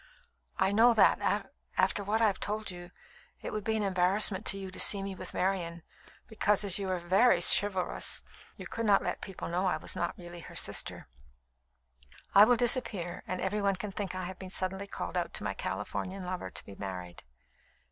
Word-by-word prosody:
I 190 Hz, +1 st, +2 dB
know 230 Hz, +3 st, +5 dB
that, -, -, +2 dB, 0.3 s
after 205 Hz, -, +2 dB
what 215 Hz, +3 st, 0 dB
I -, -, +6 dB
have 205 Hz, -3 st, +1 dB
told 210 Hz, -1 st, -3 dB
you, 175 Hz, 0 st, -10 dB, 0.5 s
it -, -, -5 dB
would 215 Hz, -, -3 dB
be 220 Hz, +2 st, 0 dB
an 215 Hz, -, -1 dB
embarrassment 190 Hz, +1 st, +2 dB
to 195 Hz, -, +2 dB
you 190 Hz, -1 st, -7 dB
to -, -, -8 dB
see 200 Hz, -1 st, +5 dB
me 195 Hz, 0 st, -4 dB
with 185 Hz, -, -7 dB
Marian, 175 Hz, -3 st, -1 dB, 0.4 s
because 210 Hz, -2 st, +1 dB
as 195 Hz, 0 st, +5 dB
you 195 Hz, -1 st, -3 dB
are 185 Hz, -, 0 dB
very 185 Hz, +4 st, +3 dB
chivalrous, 190 Hz, +1 st, +2 dB, 0.3 s
you -, -, -8 dB
could 230 Hz, -1 st, -3 dB
not 200 Hz, -1 st, +4 dB
let -, -, -3 dB
people 195 Hz, -3 st, -7 dB
know 180 Hz, +3 st, 0 dB
I 180 Hz, -, +1 dB
was -, -, -1 dB
not 175 Hz, -, -3 dB
really 175 Hz, -1 st, -9 dB
her -, -, -11 dB
sister. -, -, 0 dB, 1.3 s
I 200 Hz, +1 st, +9 dB
will 245 Hz, +1 st, +3 dB
disappear, 230 Hz, -8 st, +1 dB
and 185 Hz, 0 st, -3 dB
every 200 Hz, +3 st, -1 dB
one 200 Hz, -1 st, +1 dB
can 205 Hz, +2 st, -6 dB
think 195 Hz, -2 st, -4 dB
I 185 Hz, -, -4 dB
have 185 Hz, +1 st, -7 dB
been 190 Hz, -, -8 dB
suddenly 190 Hz, +1 st, -1 dB
called -, -, -6 dB
out -, -, -2 dB
to -, -, -3 dB
my -, -, -2 dB
Californian 190 Hz, 0 st, -4 dB
lover 180 Hz, -, -4 dB
to -, -, -7 dB
be 100 Hz, -, -11 dB
married." 90 Hz, -3 st, -7 dB
190 Hz, 200 wpm, -30 LUFS, 180-205 Hz, 1.3 s, I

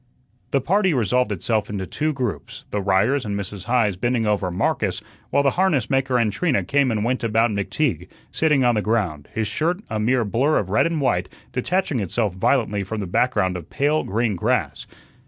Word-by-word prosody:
The 135 Hz, -, +1 dB
party 190 Hz, +3 st, +2 dB
resolved 125 Hz, 0 st, +1 dB
itself 105 Hz, +2 st, -1 dB
into 100 Hz, -2 st, -3 dB
two 155 Hz, +10 st, -1 dB
groups; 125 Hz, -, -5 dB
the 105 Hz, -, -1 dB
Ryers 100 Hz, +8 st, +2 dB
and 100 Hz, -2 st, -3 dB
Mrs. 100 Hz, -1 st, -7 dB
Heise 115 Hz, -5 st, +2 dB
bending 120 Hz, +4 st, 0 dB
over 105 Hz, -3 st, 0 dB
Marcus, 90 Hz, +2 st, -1 dB, 0.3 s
while 140 Hz, -, +2 dB
the 140 Hz, -, +3 dB
harness 175 Hz, -, +1 dB
maker 135 Hz, -1 st, +2 dB
and 110 Hz, -4 st, +1 dB
Trina 160 Hz, -3 st, +1 dB
came 140 Hz, -2 st, +2 dB
and 110 Hz, -3 st, 0 dB
went 125 Hz, +1 st, -1 dB
about 115 Hz, 0 st, +2 dB
McTeague, 100 Hz, -, -1 dB, 0.2 s
sitting 150 Hz, -4 st, +2 dB
on 120 Hz, -, +4 dB
the 105 Hz, -, +1 dB
ground, 100 Hz, -10 st, -1 dB
his 110 Hz, -1 st, -2 dB
shirt, 165 Hz, -, -1 dB
a 110 Hz, -, -1 dB
mere 120 Hz, +2 st, +2 dB
blur 130 Hz, +9 st, +2 dB
of 95 Hz, -2 st, -2 dB
red 105 Hz, -, +3 dB
and 165 Hz, -3 st, -2 dB
white, 90 Hz, -9 st, 0 dB, 0.2 s
detaching 165 Hz, +2 st, 0 dB
itself 105 Hz, +1 st, -1 dB
violently 105 Hz, +1 st, +1 dB
from 105 Hz, +3 st, -5 dB
the 100 Hz, -, -3 dB
background 95 Hz, -1 st, +1 dB
of 85 Hz, -3 st, -7 dB
pale 150 Hz, +2 st, +1 dB
green 110 Hz, +1 st, 0 dB
grass. 85 Hz, -, -1 dB
115 Hz, 190 wpm, -22 LUFS, 100-135 Hz, 0.3 s, on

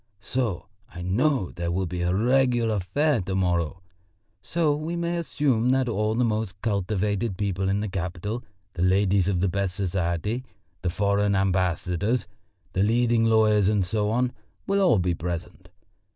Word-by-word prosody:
So 115 Hz, -5 st, -2 dB, 0.3 s
I 90 Hz, -, -7 dB
know 115 Hz, +3 st, +1 dB
there 85 Hz, 0 st, -4 dB
will 95 Hz, +2 st, 0 dB
be 90 Hz, 0 st, -4 dB
a 90 Hz, 0 st, +1 dB
regular 120 Hz, 0 st, +2 dB
fair 135 Hz, -, +1 dB
to 95 Hz, +1 st, -3 dB
morrow. 90 Hz, -1 st, 0 dB, 0.6 s
So 160 Hz, -3 st, +1 dB
we 155 Hz, +3 st, -4 dB
may 170 Hz, 0 st, -1 dB
assume 140 Hz, -8 st, +1 dB
that 130 Hz, 0 st, +2 dB
all 110 Hz, -1 st, 0 dB
the 125 Hz, -, +2 dB
most 110 Hz, -3 st, -2 dB
cultivated 100 Hz, 0 st, -1 dB
people 95 Hz, -2 st, -1 dB
in 100 Hz, +1 st, +1 dB
the 105 Hz, -, -2 dB
capital, 95 Hz, +5 st, -4 dB, 0.3 s
the 85 Hz, -, -4 dB
ladies 95 Hz, 0 st, +3 dB
of 95 Hz, -3 st, +1 dB
the 100 Hz, -, +2 dB
best 95 Hz, 0 st, -1 dB
society, 95 Hz, +4 st, -1 dB, 0.4 s
the 90 Hz, -, 0 dB
foreign 100 Hz, +2 st, +1 dB
ambassadors, 95 Hz, +3 st, 0 dB, 0.5 s
the 95 Hz, -, +1 dB
leading 115 Hz, +2 st, +3 dB
lawyers 110 Hz, -3 st, +4 dB
and 105 Hz, -3 st, +2 dB
so 105 Hz, +3 st, 0 dB
on, 125 Hz, +3 st, +1 dB, 0.3 s
will 200 Hz, 0 st, +1 dB
all 125 Hz, -, +5 dB
be 90 Hz, -1 st, +1 dB
present. 85 Hz, 0 st, -6 dB
100 Hz, 160 wpm, -25 LUFS, 90-120 Hz, 0.6 s, all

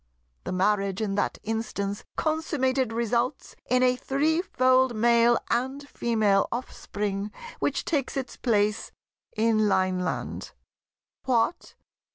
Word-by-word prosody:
The -, -, -3 dB
marriage 195 Hz, +1 st, +1 dB
in 210 Hz, -3 st, -1 dB
that 205 Hz, -, -1 dB
instance 210 Hz, -2 st, -3 dB
consummated 275 Hz, -6 st, 0 dB
results 235 Hz, +3 st, -1 dB
in 250 Hz, +1 st, +3 dB
a 250 Hz, 0 st, +4 dB
threefold 260 Hz, -3 st, +2 dB
Male 235 Hz, +1 st, +4 dB
and 265 Hz, +4 st, -1 dB
Female 215 Hz, -7 st, +1 dB
offspring 205 Hz, -4 st, -4 dB, 0.3 s
which -, -, -1 dB
takes 280 Hz, -4 st, -1 dB
its 265 Hz, -1 st, -4 dB
place 210 Hz, -3 st, 0 dB, 0.5 s
in 215 Hz, -1 st, +3 dB
Lineland." 185 Hz, -1 st, -1 dB, 0.7 s
"What! 250 Hz, +5 st, 0 dB
235 Hz, 105 wpm, -26 LUFS, 210-260 Hz, 0.7 s, a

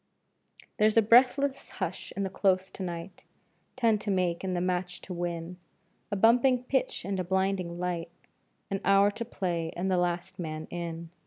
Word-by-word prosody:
There's 215 Hz, +1 st, +3 dB
a -, -, +9 dB
breathless 265 Hz, +5 st, +4 dB
hush 185 Hz, -2 st, -4 dB
in 200 Hz, -, 0 dB
the 190 Hz, -, -3 dB
Close 190 Hz, -1 st, +1 dB
to -, -, -9 dB
night 175 Hz, 0 st, -6 dB, 0.5 s
Ten 230 Hz, -4 st, +3 dB
to 210 Hz, -, -5 dB
make 180 Hz, -3 st, 0 dB
and 185 Hz, -1 st, -1 dB
the -, -, 0 dB
match 180 Hz, 0 st, -1 dB
to 185 Hz, -, -7 dB
win 175 Hz, 0 st, -4 dB, 0.5 s
A 205 Hz, -, -1 dB
bumping 245 Hz, +5 st, +4 dB
pitch 265 Hz, -8 st, -1 dB
and 195 Hz, -1 st, -2 dB
a -, -, 0 dB
blinding 190 Hz, -1 st, 0 dB
light, 175 Hz, -2 st, -2 dB, 0.6 s
An 195 Hz, -, -1 dB
hour 195 Hz, +1 st, +5 dB
to 230 Hz, -, -5 dB
play 175 Hz, -7 st, -2 dB
and 190 Hz, +2 st, -1 dB
the 185 Hz, -, +3 dB
last 175 Hz, +2 st, -2 dB
man 155 Hz, -2 st, -4 dB
in. 170 Hz, -1 st, -5 dB
185 Hz, 175 wpm, -29 LUFS, 175-205 Hz, 0.6 s, a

